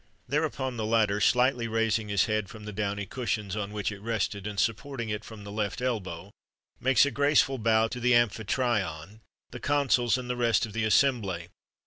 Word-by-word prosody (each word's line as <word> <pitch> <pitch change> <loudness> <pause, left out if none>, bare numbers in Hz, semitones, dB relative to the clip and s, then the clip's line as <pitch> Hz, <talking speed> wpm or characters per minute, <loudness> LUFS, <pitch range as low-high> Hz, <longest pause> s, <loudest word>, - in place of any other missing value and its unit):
Thereupon, 135 -3 -1
the 110 - -2
latter, 110 -2 +2
slightly 125 0 +3
raising 115 -1 0
his 100 -3 +3
head 110 -3 -1
from 110 0 -11
the 105 - -6
downy 100 0 -2
cushions 105 -4 -3
on 105 -1 -3
which 105 0 -2
it 100 -1 -9
rested, 105 -2 -2
and 100 -1 -4
supporting 115 +2 -2
it 105 0 -3
from 110 -2 -10
the 100 - -8
left 105 +2 -2
elbow,[XXXV 100 -7 -3 0.5
55] - - -23
makes 130 0 +5
a 140 - -1
graceful 140 -2 +2
bow 110 0 +3
to 125 - -5
the 125 0 +3
amphitryon, 110 -5 0 0.3
the - - -7
consuls, 130 -4 +2
and 125 -1 -6
the 125 - -2
rest 120 -2 +2
of 110 - -10
the 115 0 0
assembly. 105 -8 +1
110 Hz, 190 wpm, -28 LUFS, 105-125 Hz, 0.5 s, makes